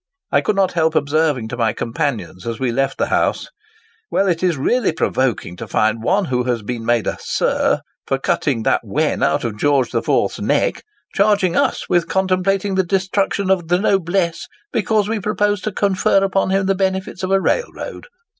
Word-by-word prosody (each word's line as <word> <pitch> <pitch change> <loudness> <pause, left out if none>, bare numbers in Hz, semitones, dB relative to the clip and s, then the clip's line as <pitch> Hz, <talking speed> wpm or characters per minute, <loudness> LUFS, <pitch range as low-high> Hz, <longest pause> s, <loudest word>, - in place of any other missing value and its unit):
1 - - +3
could 210 - 0
not 195 -2 +2
help 160 -1 +1
observing 145 -5 +1
to 115 - -5
my 115 -3 +1
companions 115 - -3
as 115 -1 -3
we 130 -2 0
left 135 +3 -1
the - - +1
house, - - 0 0.6
'Well, 195 - +1
it 170 -3 0
is 180 -4 +1
really 235 - +1
provoking 130 - -1
to - - -7
find 110 +1 +1
one 190 - +1
who 125 -5 -1
has 120 -3 -1
been 115 +1 -4
made 120 -2 +1
a - - -2
"Sir" - - 0 0.3
for 135 - +1
cutting 135 -3 0
that - - +2
wen - - -1
out - - +1
of 110 -3 -4
George 140 -3 +2
the - - 0
Fourth's - - 0
neck, - - +1 0.3
charging 200 -3 +2
us - - 0
with 175 -2 +1
contemplating 190 +2 0
the 190 0 +2
destruction 195 +1 0
of 180 -4 +1
the 175 +1 +3
noblesse, 175 -3 0 0.3
because 215 -1 +1
we 220 0 -1
propose 205 0 0
to 215 - -3
confer 195 0 +2
upon 195 0 +1
him 195 0 +1
the 195 - +2
benefits 190 -1 -2
of 185 - -2
a 195 0 +3
railroad. 480 - -3
175 Hz, 190 wpm, -19 LUFS, 130-195 Hz, 0.6 s, 1